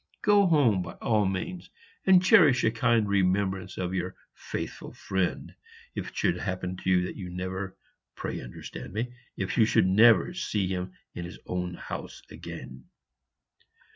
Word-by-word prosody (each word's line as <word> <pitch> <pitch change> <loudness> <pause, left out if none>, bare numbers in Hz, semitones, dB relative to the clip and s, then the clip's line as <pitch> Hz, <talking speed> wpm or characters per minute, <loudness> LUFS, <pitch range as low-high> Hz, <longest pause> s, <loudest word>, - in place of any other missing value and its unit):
Go 205 -1 +5
home 130 - +4
by - - -6
all 105 -3 +1
means; 175 - -4 0.4
and 185 -1 +7
cherish 145 -9 +6
a 115 - +3
kind 115 -1 +2
remembrance 95 -1 0
of 90 0 -2
your 90 0 -2 0.2
faithful - - -6
friend, 95 -2 -2 0.4
if - - -4
it - - -11
should - - +2
happen 90 0 -3
that 90 - -8 0.3
you 90 -3 -6
never, 95 +1 -5 0.4
pray, - - -4
understand - - -9
me, 120 +4 -3 0.2
If 95 +4 -2
you 110 - +7
should 110 - +3
never 110 - +5
see 110 - -1
him 90 0 -3 0.2
in 85 - -5
his 85 - -9
own 90 -1 -3
house - - -7
again." 65 -1 -9
95 Hz, 150 wpm, -28 LUFS, 90-115 Hz, 0.4 s, and